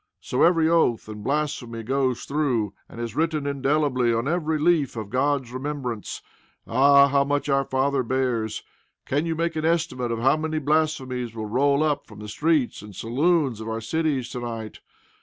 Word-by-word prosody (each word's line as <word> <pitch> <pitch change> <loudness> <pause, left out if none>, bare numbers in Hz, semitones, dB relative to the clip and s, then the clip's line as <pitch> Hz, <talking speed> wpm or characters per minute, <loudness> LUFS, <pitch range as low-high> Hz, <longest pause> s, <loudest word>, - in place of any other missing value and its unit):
So 125 - -2
every 165 -2 +5
oath 160 -10 +2
and 105 -1 -8
blasphemy 135 -5 -2
goes 130 0 0
through, 130 -9 0 0.2
and 115 - -11
is 120 -1 -4
written 155 -2 0
indelibly 140 -3 +1
on 115 +3 0
every 160 -1 0
leaf 155 -4 +2
of 110 -3 -6
God's 130 -1 0
remembrance. 130 -5 -4 0.4
Ah! 140 +3 +6
how 140 0 +3
much 145 +1 -1
our 135 0 +3
Father 135 +1 +1
bears! 120 -3 -1 0.4
Can 145 +5 0
you 165 - -1
make 165 +1 -1
an 155 - -2
estimate 160 -7 0
of 115 - -1
how 135 +6 +3
many 155 0 -2
blasphemies 135 -6 -1
will 110 -1 -4
roll 140 +6 +2
up 145 -2 -1
from 105 - -13
the 105 0 -8
streets 150 +2 0
and 105 -1 -11
saloons 135 - +1
of 110 - -5
our 110 0 -2
cities 135 +1 -1
to 125 - -5
night? 115 -2 -6
135 Hz, 175 wpm, -24 LUFS, 120-150 Hz, 0.4 s, Ah